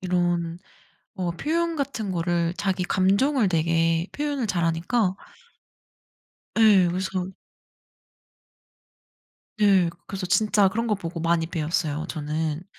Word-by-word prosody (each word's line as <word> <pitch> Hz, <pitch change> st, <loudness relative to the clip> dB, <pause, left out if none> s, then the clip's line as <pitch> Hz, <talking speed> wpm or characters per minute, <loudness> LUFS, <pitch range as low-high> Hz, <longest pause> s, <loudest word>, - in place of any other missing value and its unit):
이런 175 Hz, -2 st, -1 dB, 0.6 s
어 180 Hz, -2 st, -2 dB
표현 330 Hz, -, -1 dB
같은 265 Hz, -8 st, -3 dB
거를 170 Hz, -1 st, 0 dB
자기 190 Hz, -2 st, -1 dB
감정을 200 Hz, +7 st, +2 dB
되게 165 Hz, 0 st, +1 dB
표현을 290 Hz, -4 st, -2 dB
잘하니까. 180 Hz, +3 st, 0 dB, 1.4 s
예. 205 Hz, -5 st, +6 dB
그래서 185 Hz, +1 st, -3 dB, 2.3 s
네. 195 Hz, -5 st, +4 dB
그 170 Hz, -, -15 dB
그래서 190 Hz, -1 st, -4 dB
진짜 205 Hz, +1 st, +3 dB
그런 230 Hz, +4 st, -2 dB
거 215 Hz, -, +2 dB
보고 170 Hz, -3 st, -6 dB
많이 165 Hz, 0 st, +1 dB
배웠어요 155 Hz, -1 st, -2 dB
저는. 155 Hz, +1 st, -3 dB
180 Hz, 220 characters per minute, -24 LUFS, 165-205 Hz, 2.3 s, 예